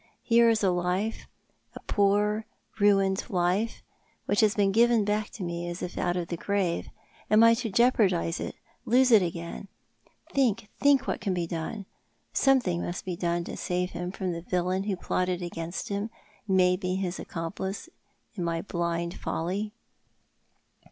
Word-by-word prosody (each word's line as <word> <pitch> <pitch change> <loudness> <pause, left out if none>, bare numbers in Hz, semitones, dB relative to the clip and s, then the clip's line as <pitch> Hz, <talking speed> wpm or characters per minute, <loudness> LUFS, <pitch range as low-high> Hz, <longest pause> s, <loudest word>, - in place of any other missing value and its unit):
Here 235 0 +5
is 220 -2 +2
a 190 - +4
life— 180 +5 -1 0.5
a - - -7
poor 210 +2 +1 0.3
ruined 195 -1 +3
life— 185 +5 0 0.4
which 205 - +1
hiis 215 -2 +3
been 200 -1 +3
given 230 0 +4
back 210 +1 0
to 200 - -6
me 175 0 -3
as 175 +1 -5
if 180 - -5
out 175 0 0
of 175 -2 -3
the 170 - -3
grave. 190 -3 -1 0.4
Am 215 +2 +6
I 230 0 +8
to 230 0 -2
jeopardise 195 -7 +2
it - - -5 0.3
—lose 255 +2 +4
it 220 -3 +8
again? 170 +2 -4 0.7
Think, 230 -6 +1
think 280 -2 +4
what - - -2
can 195 -3 -1
be 175 -1 -1
done. 170 +5 -4 0.5
Something 245 -11 +3
must 175 - -4
be 180 -2 -3
done 170 0 -1
to - - -6
save 180 0 -2
him 175 +1 -4
from 185 -1 -3
the 170 -1 -4
villain 180 +2 -1
who 205 -2 0
plotted 180 0 -1
against 170 0 -5
him, 200 +2 -2 0.4
who 195 - 0
made 180 0 +4
me 185 -1 -1
his 185 -2 -2
accomplice, 190 - -5 0.5
in 185 - -4
my 165 -1 -1
blind 170 -2 -2
folly." 195 +6 -2
190 Hz, 165 wpm, -28 LUFS, 175-210 Hz, 0.7 s, I